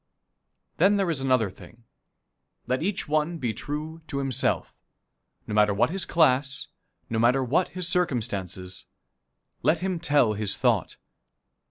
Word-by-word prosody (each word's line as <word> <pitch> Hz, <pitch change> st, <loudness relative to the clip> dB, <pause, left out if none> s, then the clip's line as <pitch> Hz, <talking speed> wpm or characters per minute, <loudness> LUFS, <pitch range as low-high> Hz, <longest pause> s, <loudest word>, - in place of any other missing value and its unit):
Then 195 Hz, +5 st, +4 dB
there 190 Hz, -4 st, +1 dB
is 140 Hz, -5 st, -1 dB
another 130 Hz, -7 st, +2 dB
thing. 115 Hz, +4 st, -16 dB, 0.8 s
Let 130 Hz, +1 st, -1 dB
each 190 Hz, +3 st, -2 dB
one 155 Hz, +3 st, 0 dB
be 120 Hz, -7 st, -2 dB
true 150 Hz, +7 st, -6 dB
to 140 Hz, -, -4 dB
himself. 135 Hz, -3 st, -1 dB, 0.7 s
No -, -, -5 dB
matter 105 Hz, -1 st, +3 dB
what 105 Hz, -, +2 dB
his 195 Hz, +1 st, 0 dB
class, 140 Hz, -4 st, +2 dB, 0.4 s
no 115 Hz, -, -2 dB
matter 125 Hz, +4 st, +3 dB
what 145 Hz, +9 st, +1 dB
his 180 Hz, -2 st, 0 dB
circumstances, 100 Hz, -, -2 dB, 0.7 s
let 160 Hz, -, +3 dB
him 185 Hz, 0 st, -2 dB
tell 145 Hz, -9 st, +3 dB
his 105 Hz, -2 st, -2 dB
thought. -, -, +1 dB
135 Hz, 140 wpm, -26 LUFS, 110-165 Hz, 0.8 s, Then